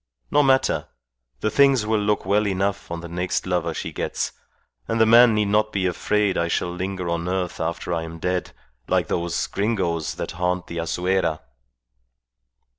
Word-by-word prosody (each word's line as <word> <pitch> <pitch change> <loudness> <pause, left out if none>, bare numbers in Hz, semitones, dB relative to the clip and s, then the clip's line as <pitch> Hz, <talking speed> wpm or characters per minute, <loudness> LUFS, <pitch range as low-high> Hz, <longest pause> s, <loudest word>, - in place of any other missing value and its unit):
No 145 - +5
matter! 135 -1 +2 0.5
The 110 - 0
things 135 -5 +4
will 110 0 +1
look 105 -1 0
well 105 +2 +2
enough 100 +1 -1
on 85 0 -4
the 85 - -7
next 90 +1 -2
lover 90 -2 0
she - - -5
gets, - - -2 0.6
and 115 - -1
the 110 - +6
man 115 0 +7
need 105 -1 +1
not 105 +1 +2
be 95 -2 -1
afraid 100 +2 +1
I 85 - +1
shall 85 +1 -1
linger 90 0 -4
on 85 +1 -2
earth 90 -1 -2
after 85 +1 -2
I 85 - -1
am 80 0 -7
dead, 90 +2 -2 0.4
like - - +1
those 85 -1 -1
Gringos 95 -7 -1
that - - -4
haunt 90 +1 -1
the 85 - -7
Azuera." 90 0 0
95 Hz, 175 wpm, -23 LUFS, 85-105 Hz, 0.6 s, man